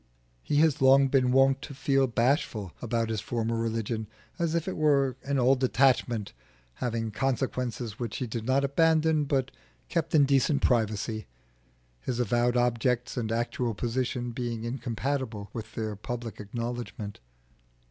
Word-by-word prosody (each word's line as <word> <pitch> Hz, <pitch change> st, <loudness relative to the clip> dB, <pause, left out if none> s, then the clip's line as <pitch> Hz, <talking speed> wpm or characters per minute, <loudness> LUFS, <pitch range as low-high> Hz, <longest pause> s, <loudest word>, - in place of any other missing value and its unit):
He 145 Hz, -, -2 dB
has 155 Hz, -2 st, +3 dB
long 135 Hz, +1 st, +6 dB
been 130 Hz, -2 st, +3 dB
wont 135 Hz, +1 st, +4 dB
to 140 Hz, -, -8 dB
feel 135 Hz, 0 st, +2 dB
bashful 115 Hz, -, 0 dB
about 115 Hz, -1 st, -1 dB
his 110 Hz, -2 st, -2 dB
former 115 Hz, 0 st, -2 dB
religion; 115 Hz, -1 st, -2 dB, 0.3 s
as 170 Hz, -1 st, 0 dB
if 165 Hz, +1 st, -1 dB
it 190 Hz, -, -2 dB
were 140 Hz, -4 st, +3 dB
an 140 Hz, 0 st, -1 dB
old 130 Hz, +1 st, +3 dB
attachment 125 Hz, -5 st, +2 dB, 0.5 s
having 115 Hz, -2 st, -1 dB
consequences 125 Hz, -2 st, -2 dB
which 120 Hz, -4 st, -3 dB
he 130 Hz, -, -2 dB
did 115 Hz, -1 st, -4 dB
not 130 Hz, +4 st, +2 dB
abandon 160 Hz, +1 st, +3 dB
but 135 Hz, -1 st, 0 dB, 0.4 s
kept 165 Hz, -2 st, 0 dB
in 145 Hz, -2 st, +6 dB
decent 140 Hz, +1 st, +2 dB
privacy, 110 Hz, -2 st, 0 dB, 0.7 s
his 125 Hz, -, -3 dB
avowed 120 Hz, +1 st, +2 dB
objects 120 Hz, +1 st, +1 dB
and 115 Hz, -4 st, -2 dB
actual 120 Hz, 0 st, -1 dB
position 120 Hz, +1 st, -2 dB
being 120 Hz, -2 st, -4 dB
incompatible 120 Hz, -3 st, -3 dB
with 110 Hz, -2 st, -7 dB
their 110 Hz, -2 st, -3 dB
public 115 Hz, +2 st, -6 dB
acknowledgment. 115 Hz, -1 st, -5 dB
125 Hz, 145 wpm, -28 LUFS, 115-135 Hz, 0.7 s, long